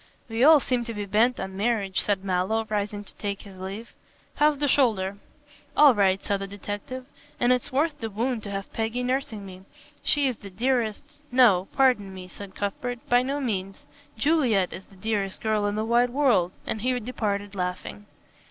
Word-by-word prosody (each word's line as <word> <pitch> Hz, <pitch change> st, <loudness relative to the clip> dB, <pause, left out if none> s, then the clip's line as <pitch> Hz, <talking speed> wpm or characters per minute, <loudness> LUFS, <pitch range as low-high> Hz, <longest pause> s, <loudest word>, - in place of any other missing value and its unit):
"We 225 Hz, +1 st, 0 dB
all 310 Hz, +1 st, +8 dB
seem 250 Hz, -2 st, -1 dB
to 230 Hz, -1 st, -5 dB
be 205 Hz, -1 st, -3 dB
bent 225 Hz, +5 st, +2 dB
on 190 Hz, 0 st, -5 dB
marriage," 205 Hz, -2 st, 0 dB
said 200 Hz, -2 st, 0 dB
Mallow, 190 Hz, +4 st, 0 dB
rising 205 Hz, 0 st, -2 dB
to -, -, -12 dB
take 200 Hz, -1 st, -4 dB
his 195 Hz, -2 st, -12 dB
leave. 195 Hz, +5 st, -7 dB, 0.4 s
"How's 300 Hz, 0 st, +3 dB
the 290 Hz, +1 st, +1 dB
shoulder?" 210 Hz, -8 st, +2 dB, 0.6 s
"All 290 Hz, -3 st, +8 dB
right," 195 Hz, -3 st, +2 dB
said 200 Hz, -1 st, 0 dB
the 195 Hz, -, -4 dB
detective, 205 Hz, +6 st, -6 dB, 0.3 s
"and 245 Hz, +1 st, +4 dB
it's 250 Hz, -, -2 dB
worth 295 Hz, +4 st, 0 dB
the 225 Hz, -, -3 dB
wound 230 Hz, +3 st, -1 dB
to 205 Hz, -, -7 dB
have 195 Hz, -1 st, -5 dB
Peggy 225 Hz, +2 st, -1 dB
nursing 250 Hz, -5 st, -2 dB
me. 185 Hz, -1 st, -10 dB, 0.4 s
She 290 Hz, -1 st, +2 dB
is 250 Hz, -4 st, -2 dB
the 200 Hz, -, -10 dB
dearest 230 Hz, +3 st, -1 dB
" -, -, -33 dB
"No, 195 Hz, -6 st, +5 dB
pardon 250 Hz, -8 st, +3 dB
me," 185 Hz, -1 st, -8 dB
said 195 Hz, +2 st, -11 dB
Cuthbert, 240 Hz, +4 st, -4 dB
"by 245 Hz, 0 st, +5 dB
no 275 Hz, +3 st, -2 dB
means. 195 Hz, -7 st, -3 dB, 0.3 s
Juliet 245 Hz, -, +2 dB
is 190 Hz, -, -9 dB
the 195 Hz, -, -19 dB
dearest 200 Hz, -1 st, -2 dB
girl 215 Hz, -2 st, +1 dB
in 205 Hz, -, -1 dB
the 215 Hz, +1 st, -1 dB
wide 240 Hz, +2 st, +3 dB
world," 240 Hz, -10 st, +2 dB
and 220 Hz, -, -3 dB
he 250 Hz, +1 st, +1 dB
departed 205 Hz, -4 st, -3 dB
laughing. 185 Hz, +2 st, -4 dB
215 Hz, 190 wpm, -26 LUFS, 195-250 Hz, 0.6 s, all